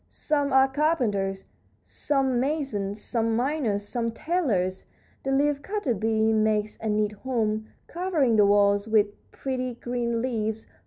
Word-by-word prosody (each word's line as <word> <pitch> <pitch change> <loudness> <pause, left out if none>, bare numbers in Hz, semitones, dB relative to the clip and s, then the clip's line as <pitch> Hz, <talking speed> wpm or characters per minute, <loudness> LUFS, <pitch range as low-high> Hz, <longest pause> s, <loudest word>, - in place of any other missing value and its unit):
Some 290 -2 -1
are 265 0 +6
carpenters, 240 -10 0 0.4
some 270 -4 0
masons, 245 -8 -2
some 230 0 -1
miners, 240 -6 -1
some 235 0 -1
tailors. 225 - -1 0.4
The 270 - -2
leaf 285 +1 +2
cutter 400 - -1
bee 220 +1 +1
makes 215 -1 +1
a 220 - -2
neat 210 0 +1
home, 220 -1 -2 0.2
covering 330 -9 +1
the 210 -1 +6
walls 200 0 +3
with 210 -2 +3 0.2
pretty, 255 -2 -3
green 240 -1 -2
leaves. 220 -3 -2
230 Hz, 130 wpm, -26 LUFS, 210-270 Hz, 0.4 s, are